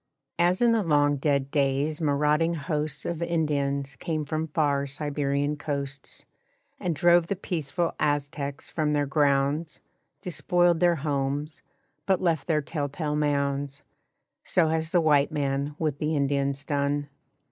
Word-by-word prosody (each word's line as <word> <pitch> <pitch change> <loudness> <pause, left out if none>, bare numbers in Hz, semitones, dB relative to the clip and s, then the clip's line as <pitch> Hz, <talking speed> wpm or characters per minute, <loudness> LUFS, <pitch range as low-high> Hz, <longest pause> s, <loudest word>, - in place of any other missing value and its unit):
As 175 +5 +3
in 235 - +5
the 225 -1 +3
long 145 -4 +3
dead 140 -1 0
days 140 +2 0
marauding 150 +3 +2
hosts 150 0 -2
Of 170 -1 -3
Indians 140 -4 -1
came 155 -3 -3
from 155 +2 -2
far 145 -2 +1
Siberian 145 0 -1
coasts, 140 -2 -4 0.5
And 175 -3 -1
drove 175 +2 +4
the 200 - -1
peaceful 170 -2 -2
Aztecs 145 -1 -2
from 150 -2 0
their 145 -1 +2
grounds, 145 +2 +1 0.4
Despoiled 175 0 +1
their 175 -1 +4
homes 145 0 -2 0.5
(but 190 -2 +3
left 165 -4 0
their 155 -3 +1
tell 145 -2 -3
tale 150 0 -3
mounds), 140 -1 -1 0.6
So 165 -3 +2
has 160 0 -1
the 175 0 +3
white 145 -3 +3
man 140 -1 -1
with 150 -3 -1
the 155 +1 0
Indians 140 -1 0
done. 145 0 0
150 Hz, 140 wpm, -26 LUFS, 140-160 Hz, 0.6 s, in